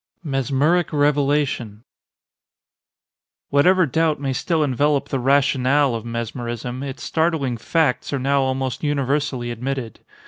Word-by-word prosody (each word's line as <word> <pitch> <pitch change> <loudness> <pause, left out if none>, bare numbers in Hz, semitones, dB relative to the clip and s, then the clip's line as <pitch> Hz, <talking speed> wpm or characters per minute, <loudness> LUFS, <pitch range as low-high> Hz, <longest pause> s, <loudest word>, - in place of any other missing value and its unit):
MESMERIC 145 +4 +1
REVELATION 145 -6 0 1.7
Whatever 180 +6 +4
doubt 160 +1 0
may 135 -2 -2
still 160 +3 0
envelop 145 +1 +1
the 135 - -1
rationale 135 0 +2
of 115 -1 -4
mesmerism, 120 +1 -4
its 135 -2 -6
startling 160 -6 0
facts 135 +4 0
are 140 - 0
now 135 +1 +1
almost 130 0 -2
universally 140 -3 -1
admitted. 125 -1 -4
135 Hz, 110 wpm, -21 LUFS, 125-145 Hz, 1.7 s, Whatever